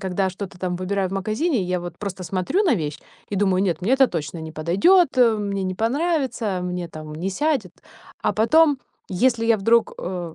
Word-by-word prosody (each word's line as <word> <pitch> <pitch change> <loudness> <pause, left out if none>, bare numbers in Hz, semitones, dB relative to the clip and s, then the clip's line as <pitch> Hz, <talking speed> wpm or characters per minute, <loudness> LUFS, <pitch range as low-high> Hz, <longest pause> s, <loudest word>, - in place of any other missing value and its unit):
когда 190 0 -1
что-то 190 -1 -8
там 180 -1 -2
выбираю 190 +1 -1
в 190 - -8
магазине, 220 - -1
я 180 0 -1
вот 175 -1 -7
просто 195 -2 -5
смотрю 185 - 0
на 340 - +4
вещь 150 -6 -4 0.3
и - - 0
думаю: 190 -1 +2
нет, 175 -5 0
мне 215 +8 +1
это 265 0 +6
точно 160 -1 -4
не 160 0 -7
подойдет, 200 - +4
а, 230 -3 +5
мне 200 -2 -2
не 185 0 -2
понравится, 255 - -1
а, - - -4
мне 180 -1 -4
там 155 -1 -9
не 175 +5 -3
сядет. 265 - -1 0.5
А - - +1
потом, 290 +6 +4 0.3
если 230 +4 +1
я 230 -1 +4
вдруг, 230 +3 +2
а, 175 -3 -5
195 Hz, 205 wpm, -22 LUFS, 180-235 Hz, 0.5 s, это